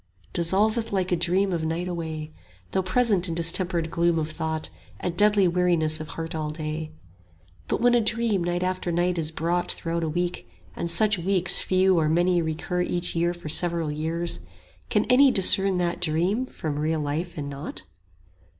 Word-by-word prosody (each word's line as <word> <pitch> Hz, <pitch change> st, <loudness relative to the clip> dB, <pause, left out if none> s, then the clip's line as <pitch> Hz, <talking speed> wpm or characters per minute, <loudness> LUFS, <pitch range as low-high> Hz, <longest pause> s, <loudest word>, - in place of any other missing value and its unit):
Dissolveth 210 Hz, +7 st, +1 dB
like 185 Hz, -2 st, -1 dB
a -, -, +4 dB
dream 185 Hz, +3 st, +1 dB
of 165 Hz, -2 st, -2 dB
night 165 Hz, +3 st, -2 dB
away; 160 Hz, -3 st, -5 dB, 0.4 s
Though 190 Hz, -, +1 dB
present 190 Hz, -2 st, +2 dB
in 165 Hz, -, -3 dB
distempered 170 Hz, 0 st, +2 dB
gloom 170 Hz, 0 st, +1 dB
of 155 Hz, -1 st, -2 dB
thought 160 Hz, 0 st, -2 dB, 0.3 s
And 175 Hz, -, -3 dB
deadly 205 Hz, 0 st, +4 dB
weariness 170 Hz, -3 st, +1 dB
of 155 Hz, -, -6 dB
heart 165 Hz, +1 st, -5 dB
all 155 Hz, -1 st, -3 dB
day. 155 Hz, 0 st, -4 dB
10 155 Hz, 0 st, -16 dB, 0.7 s
But -, -, -1 dB
when 245 Hz, 0 st, +4 dB
a 240 Hz, -, +4 dB
dream 220 Hz, -3 st, +1 dB
night 175 Hz, +1 st, -1 dB
after 185 Hz, -1 st, -2 dB
night 175 Hz, +1 st, 0 dB
is 155 Hz, -1 st, -1 dB
brought 170 Hz, +2 st, -1 dB
Throughout 170 Hz, 0 st, -3 dB
a 160 Hz, -, -1 dB
week, 175 Hz, -, -3 dB, 0.3 s
and 170 Hz, -, -3 dB
such 205 Hz, +2 st, +4 dB
weeks 185 Hz, 0 st, +1 dB
few 185 Hz, -1 st, +2 dB
or 155 Hz, -1 st, +1 dB
many 175 Hz, +2 st, +2 dB
Recur 160 Hz, +3 st, -2 dB
each 175 Hz, -1 st, -2 dB
year 170 Hz, +1 st, +1 dB
for 175 Hz, -2 st, -10 dB
several 165 Hz, 0 st, +2 dB
years, 165 Hz, +3 st, -1 dB, 0.5 s
can -, -, +1 dB
any 270 Hz, +2 st, +5 dB
Discern 195 Hz, -3 st, +4 dB
that 175 Hz, -1 st, -2 dB
dream 180 Hz, +10 st, 0 dB
from 150 Hz, -9 st, -5 dB
real 155 Hz, +1 st, 0 dB
life 160 Hz, +4 st, -3 dB
in 140 Hz, -1 st, -5 dB
aught? 140 Hz, +3 st, -6 dB
175 Hz, 180 wpm, -25 LUFS, 160-185 Hz, 0.7 s, any